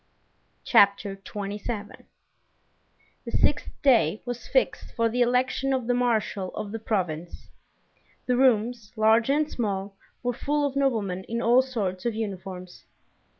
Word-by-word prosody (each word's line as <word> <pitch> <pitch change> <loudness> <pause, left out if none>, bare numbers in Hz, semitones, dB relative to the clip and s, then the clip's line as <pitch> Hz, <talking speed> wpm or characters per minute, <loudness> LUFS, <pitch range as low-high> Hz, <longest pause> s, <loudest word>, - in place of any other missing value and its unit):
Chapter 200 -3 +4
27 205 +2 -6 1.2
The - - -7
sixth - - +1
day 225 - +3
was 245 -1 -5
fixed - - 0
for 230 -1 +2
the 245 +2 -1
election 255 +2 +1
of 255 -3 -1
the 245 - +1
marshal 225 -6 0
of 215 -1 -5
the 225 - -4
province. 175 -6 -3 0.7
The 250 - +1
rooms, 240 -3 +2
large 220 +2 +4
and 295 +2 +2
small, 200 -6 -3 0.3
were 245 0 0
full 290 +4 0
of 280 -1 -2
noblemen 215 -10 0
in 230 +1 -3
all 240 +2 +5
sorts 215 -7 -3
of 230 - -1
uniforms. 190 -4 -6
225 Hz, 135 wpm, -26 LUFS, 200-250 Hz, 1.2 s, all